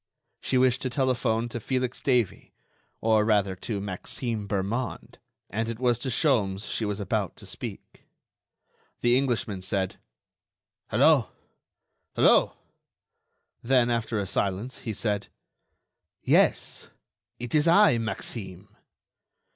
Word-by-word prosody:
She 130 - +1
wished 125 0 +3
to 130 - -1
telephone 120 -3 0
to 120 - -5
Felix 130 +2 -2
Davey, 125 -8 0 0.5
or 110 -1 +3
rather 100 -3 +2
to 100 +2 -4
Maxime 105 +3 -4
Bermond, 105 +6 -3 0.3
and 115 +3 -2
it 115 - -4
was 120 -1 +1
to 130 - -2
Sholmes 110 -8 +1
she 110 - -1
was 105 0 -3
about 100 -3 -2
to - - -12
speak. - - -8 0.9
The 120 0 +4
Englishman 120 -7 0
said: 95 0 -2 0.9
"Hello... - - +4 0.9
Hello!" - - +4 1.0
Then, 120 -1 +3
after 115 -1 -1
a 100 - -1
silence, 100 +6 -2
he 110 - -4
said: 105 -2 -1 1.0
"Yes, - - +2 0.5
it 120 0 -7
is 155 +1 +3
I, 170 - +6
Maxime." 105 -3 -5
115 Hz, 115 wpm, -27 LUFS, 100-125 Hz, 1.0 s, I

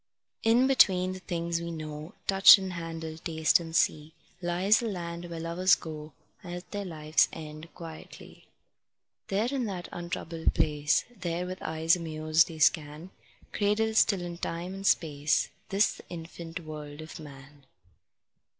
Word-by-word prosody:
In 235 +3 +4
between 185 -9 +4
the 185 - -7
things 170 -2 -2
we 170 - -5
know, 155 0 -7
Touch 195 +2 +9
and 190 -1 -5
handle, 165 -2 -6
taste 160 -2 +2
and 165 -1 -7
see, 155 -1 +1 0.3
Lies 180 +5 +3
the 235 - -2
land 170 -3 -5
where 170 -1 -6
lovers 175 +3 +3
go 155 -2 -8 0.3
At 175 0 -8
their 205 -1 -4
life's 155 -3 +2
end 155 0 -9
quietly. 165 -3 -11 0.8
There, 205 +4 0
in 265 -3 -1
that 185 -4 -5
untroubled 170 -1 -3
place, 150 0 +1
There, 175 -3 -3
with 185 +1 -6
eyes 160 +1 +2
amused, 155 -1 +2
they 165 - -9
scan, 155 +2 +1 0.4
Cradled 220 +2 +1
still 200 -4 +3
in 175 -1 -6
time 175 +2 -4
and 195 0 -3
space, 145 -2 +1 0.2
This, 200 +1 +3
the - - -13
infant 165 0 -7
world 150 -1 -8
of 155 +1 -9
man. 140 -2 -13
170 Hz, 150 wpm, -29 LUFS, 155-185 Hz, 0.8 s, Touch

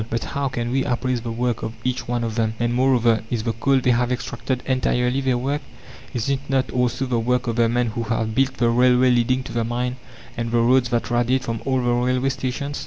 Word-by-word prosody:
But 115 0 -2
how 140 0 -2
can 120 -2 -3
we 135 +1 +1
appraise 125 -1 -1
the 115 0 -4
work 120 +1 -1
of 110 - -5
each 125 -1 -2
one 120 -1 -1
of 115 -1 -2
them? 110 -1 0
And, 120 0 0
moreover, 120 -3 +3
Is 115 -3 -2
the 115 - -1
coal 135 +4 +2
they 125 - +3
have 120 +1 +1
extracted 125 +1 -3
entirely 130 0 +1
their 130 -2 +1
work? 140 +4 -1 0.5
Is 120 -3 -3
it 140 -1 +1
not 135 -1 +1
also 125 +1 0
the 125 -2 0
work 125 +2 0
of 115 -1 -2
the 115 -1 +3
men 120 0 +1
who 115 - -3
have 110 -1 -1
built 135 +2 +1
the 120 -1 +2
railway 125 +1 +4
leading 125 +2 +2
to - - -9
the 115 -1 0
mine 125 +2 -2 0.4
and 115 0 -3
the 120 - +1
roads 120 +1 +3
that 120 0 -1
radiate 120 +2 +1
from 115 -1 -3
all 130 -2 +1
the 120 - +1
railway 125 +2 +1
stations? 135 +2 -3
125 Hz, 240 wpm, -22 LUFS, 120-130 Hz, 0.5 s, railway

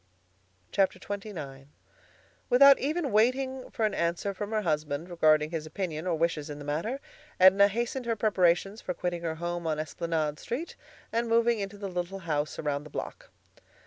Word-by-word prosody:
XXIX 185 -8 -2 0.8
Without 275 +2 +8
even 300 0 -1
waiting 255 +4 +1
for 225 - -1
an 210 - 0
answer 170 +4 -1
from 205 +2 -5
her 215 -1 -1
husband 155 -1 -1
regarding 155 -2 +3
his 160 -2 -4
opinion 165 0 -4
or 175 - +1
wishes 160 -2 -1
in 145 - -6
the 145 - -9
matter, 165 - -2 0.4
Edna 190 +2 +7
hastened 235 +4 -3
her 230 - +1
preparations 195 -1 +2
for 180 - -4
quitting 175 -1 -3
her 165 -2 -2
home 175 0 -3
on 155 -1 0
Esplanade 155 -1 -2
Street 285 +9 -5 0.4
and 230 0 0
moving 230 0 +3
into 200 0 -5
the 200 -1 -5
little 180 +1 -3
house 150 -2 -1
around 145 -1 -2
the 150 - -11
block. - - -7
180 Hz, 165 wpm, -29 LUFS, 155-220 Hz, 0.8 s, Without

